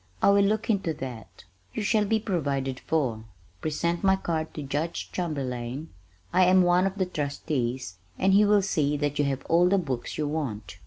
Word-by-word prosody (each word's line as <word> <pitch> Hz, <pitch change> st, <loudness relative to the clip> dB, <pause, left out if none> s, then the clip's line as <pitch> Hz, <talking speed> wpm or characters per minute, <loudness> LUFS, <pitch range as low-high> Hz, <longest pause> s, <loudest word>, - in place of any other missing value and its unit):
"I -, -, +5 dB
will 200 Hz, 0 st, +5 dB
look 210 Hz, +2 st, +1 dB
into 195 Hz, -7 st, 0 dB
that. 125 Hz, -5 st, -8 dB, 0.3 s
You -, -, -2 dB
shall 210 Hz, 0 st, +2 dB
be 220 Hz, +2 st, +2 dB
provided 140 Hz, -, -2 dB
for. 125 Hz, -9 st, -1 dB, 0.4 s
Present 170 Hz, +3 st, -1 dB
my 190 Hz, 0 st, +5 dB
card 160 Hz, -4 st, -2 dB
to 150 Hz, -, -4 dB
Judge 150 Hz, +5 st, -3 dB
Chamberlain; 135 Hz, -4 st, -3 dB, 0.4 s
I 185 Hz, +1 st, +5 dB
am 185 Hz, 0 st, +5 dB
one 180 Hz, +2 st, +4 dB
of 195 Hz, -, -4 dB
the 190 Hz, -, +1 dB
trustees, 130 Hz, -, -3 dB, 0.2 s
and 190 Hz, +1 st, +3 dB
he 205 Hz, +2 st, +6 dB
will 205 Hz, -1 st, +4 dB
see 150 Hz, -6 st, +1 dB
that 145 Hz, 0 st, -1 dB
you 145 Hz, -, +3 dB
have 135 Hz, -1 st, -2 dB
all 175 Hz, +2 st, +4 dB
the 200 Hz, -, +4 dB
books 135 Hz, -10 st, -3 dB
you 150 Hz, -, -1 dB
want." 110 Hz, -11 st, -4 dB
155 Hz, 190 wpm, -27 LUFS, 135-185 Hz, 0.4 s, he